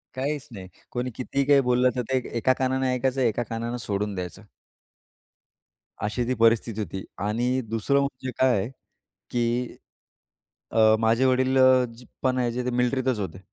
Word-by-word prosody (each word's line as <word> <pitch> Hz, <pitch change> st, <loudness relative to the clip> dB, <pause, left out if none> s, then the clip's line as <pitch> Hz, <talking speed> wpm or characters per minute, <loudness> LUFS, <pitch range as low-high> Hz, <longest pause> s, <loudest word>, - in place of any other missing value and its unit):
काहीच 140 Hz, +2 st, -3 dB
नाही. 95 Hz, -4 st, -9 dB, 0.2 s
कोणी 125 Hz, +1 st, -2 dB
कितीही 135 Hz, +2 st, -1 dB
काही 140 Hz, -1 st, +5 dB
बोललं, 125 Hz, 0 st, +3 dB
तर 125 Hz, -, 0 dB
ते 130 Hz, -, +3 dB, 0.2 s
एका 130 Hz, +3 st, +3 dB
कानाने 130 Hz, 0 st, +1 dB
ऐकायचं 130 Hz, +1 st, 0 dB
एका 120 Hz, -1 st, +1 dB
कानाने 115 Hz, +1 st, -3 dB
सोडून 100 Hz, 0 st, -2 dB
द्यायचं. 90 Hz, +2 st, -6 dB, 1.6 s
अशी 105 Hz, +4 st, -1 dB
ती 130 Hz, -, +1 dB
परिस्थिती 115 Hz, -1 st, +2 dB
होती 95 Hz, 0 st, -5 dB, 0.2 s
आणि 120 Hz, +5 st, 0 dB
दुसरं 115 Hz, +5 st, +1 dB
म्हणजे 130 Hz, -2 st, -4 dB
काय, 120 Hz, -5 st, +2 dB, 0.6 s
की 120 Hz, +1 st, -1 dB, 0.9 s
अ, 110 Hz, -1 st, +5 dB
माझे 115 Hz, +3 st, +3 dB
वडील 130 Hz, +1 st, +2 dB
अ, 130 Hz, -1 st, +6 dB, 0.4 s
पण 130 Hz, -1 st, +2 dB
याचे 120 Hz, 0 st, -1 dB
ते 125 Hz, -, -1 dB
मिलिट्रीतच 125 Hz, -1 st, +1 dB
होते. 95 Hz, -3 st, -5 dB
125 Hz, 145 wpm, -25 LUFS, 110-130 Hz, 1.6 s, अ